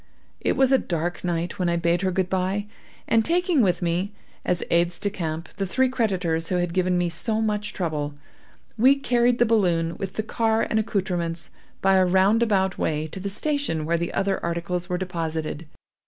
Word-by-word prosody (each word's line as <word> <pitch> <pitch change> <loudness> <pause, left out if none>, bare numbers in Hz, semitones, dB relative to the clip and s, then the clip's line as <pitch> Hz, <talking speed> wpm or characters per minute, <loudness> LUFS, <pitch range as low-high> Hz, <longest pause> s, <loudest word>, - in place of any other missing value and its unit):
It - - 0
was 265 0 +4
a 265 - +5
dark 170 -1 -3
night 175 +2 -2
when 180 -2 +1
I 170 - +1
bade 170 +1 +1
her 190 - +1
good 185 0 0
bye, 190 +2 -1 0.4
and 225 -1 +3
taking 345 - +2
with 180 -4 +1
me, 175 +4 0 0.3
as 180 - 0
aides 170 0 +2
de 205 - 0
camp, 165 -3 -4
the 195 - -1
three 260 +7 +2
creditors 185 -10 0
who 185 - 0
had 175 -1 0
given 185 0 +2
me 175 0 +1
so 215 +6 -1
much 210 -1 -1
trouble, 150 -5 -3 0.6
we 260 +4 +6
carried 245 -3 +2
the 240 - +4
balloon, 175 -7 +2
with 195 -2 -5
the 215 - -2
car 225 0 +1
and 220 - 0
accoutrements, 180 -6 -2 0.3
by 195 0 +5
a 185 - +5
roundabout 190 +1 +3
way, 155 0 0
to 190 - -7
the 200 +2 -3
station 280 - -1
where 170 +1 +1
the 170 - -2
other 195 0 -1
articles 170 +1 -2
were 180 - 0
deposited. 165 -3 -3
185 Hz, 190 wpm, -24 LUFS, 170-215 Hz, 0.6 s, we